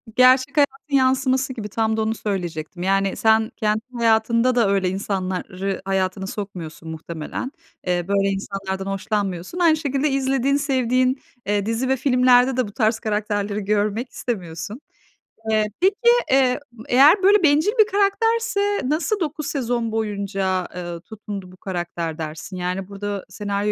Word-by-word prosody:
gerçek 255 +3 +5
hayatın 285 0 +1
yansıması 260 0 +2
gibi. 220 -4 -6
Tam 220 +1 0
da - - +1
onu 220 +1 0
söyleyecektim. 175 -5 -4
Yani 195 0 +1
sen 220 0 +3
kendi 215 -1 0 0.2
hayatında 230 +2 +3
da 230 -5 +3
öyle 195 -2 +2
insanları 190 0 -3
hayatını 190 0 -1
sokmuyorsun 180 -6 -7
muhtemelen. 160 - -5 0.4
Eee, 175 -1 0
böyle 200 0 +2
insanlardan 195 -1 -4
hoşlanmıyorsun. 195 - -3
Aynı 330 -3 +4
şekilde 285 -1 0
izlediğin, 270 0 +1
sevdiğin, 255 -2 +1 0.3
eee, 205 -1 0
dizi 230 +4 -1
ve 265 - +3
filmlerde 250 0 +4
de 255 -4 +1
bu - - -10
tarz 220 0 +1
karakterleri 210 -1 -1
görmek 210 +4 0
istemiyorsun. 185 - -5 0.7
Eee, 215 -1 +3
peki, 380 +2 +4 0.4
eee, 260 -1 +4 0.3
eğer 295 +10 +6
böyle 400 0 +5
bencil 310 +6 +4
bir 435 - +8
karakterse 410 0 +1
nasıl 345 +8 0
9 305 -3 -3
sezon 240 -4 -1
boyunca, 200 -4 -1
ııı, 175 -1 -6
tutundu 200 -2 -8
bu 185 - -16
karakter 175 -4 -4
dersin? 160 +4 -6
Yani 180 +1 -3
burada 200 0 -5
senaryo 205 0 -2
215 Hz, 140 wpm, -22 LUFS, 195-260 Hz, 0.7 s, bir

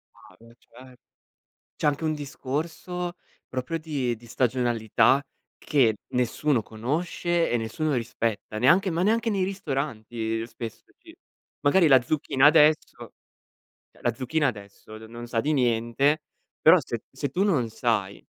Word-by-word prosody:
Ah 95 - -18
beh 115 +1 -18
cer 130 0 -17 0.8
cioè, 150 - 0
anche 145 +2 0
un 155 - +1
discorso 155 +5 -4 0.3
proprio 130 +5 -3
di 140 -7 -2
di 120 - -17
stagionalità 120 +1 +2 0.4
che 125 -8 +2 0.2
nessuno 125 +2 +1
conosce 165 +10 -1
e 120 - +1
nessuno 130 +7 -2
rispetta, 115 -3 -3
neanche 175 - +4
ma 165 +2 -1
neanche 225 +2 +2
nei 195 -3 0
ristoranti 120 - -3
spesso 115 -1 -8
ci - - -16 0.5
magari 165 +4 +4
la 130 -3 +6
zucchina 135 0 +1
adesso 155 0 +4 0.8
eh, - - -23
la 120 - +1
zucchina 145 +5 0
adesso 105 0 -9
n 110 0 -12
non 120 +1 -8
sa 115 -1 -1
di 150 - 0
niente, 125 +3 +1 0.4
però - - +8
se - - -5
se 140 - -4
tu 180 +8 0
non 155 - +2
sai 110 -4 -1
130 Hz, 140 wpm, -26 LUFS, 115-155 Hz, 0.8 s, però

